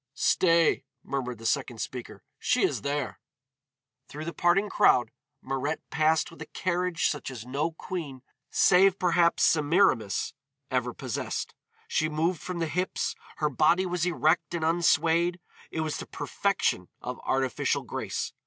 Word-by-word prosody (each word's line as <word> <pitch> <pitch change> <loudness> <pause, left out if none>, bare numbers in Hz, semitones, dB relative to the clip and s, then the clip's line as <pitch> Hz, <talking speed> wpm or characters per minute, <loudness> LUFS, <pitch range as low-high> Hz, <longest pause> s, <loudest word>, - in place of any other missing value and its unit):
"Stay," 170 -3 +3 0.2
murmured 125 -3 -3
the 115 - -11
second 130 -1 0
speaker, 125 +2 -6 0.2
"she - - +2
is - - +1
there." 140 -1 -2 0.9
Through 155 +2 -7
the 170 - -4
parting 175 +4 +3
crowd 125 - +4 0.3
Mirette 135 +4 -3
passed 160 +2 +2
with 165 - -14
a - - -6
carriage 180 -2 0
such 145 - -3
as 120 -4 -8
no 145 +6 -1
queen, 155 -7 -6 0.3
save 190 +1 +5
perhaps 175 -2 +3
Semiramis, 150 - +2 0.4
ever 125 -1 0
possessed. - - -4 0.3
She 155 - +1
moved 160 +2 0
from 180 -1 -5
the 165 - 0
hips, 180 +4 -1 0.2
her 150 - 0
body 165 +7 +3
was 180 -2 -1
erect 170 0 +1
and 165 -2 -1
unswayed. 170 +1 +2 0.3
It 160 - -3
was 155 -1 -2
the - - -7
perfection - - -1
of - - -6
artificial 130 -1 0
grace. - - -4
160 Hz, 145 wpm, -28 LUFS, 135-175 Hz, 0.9 s, save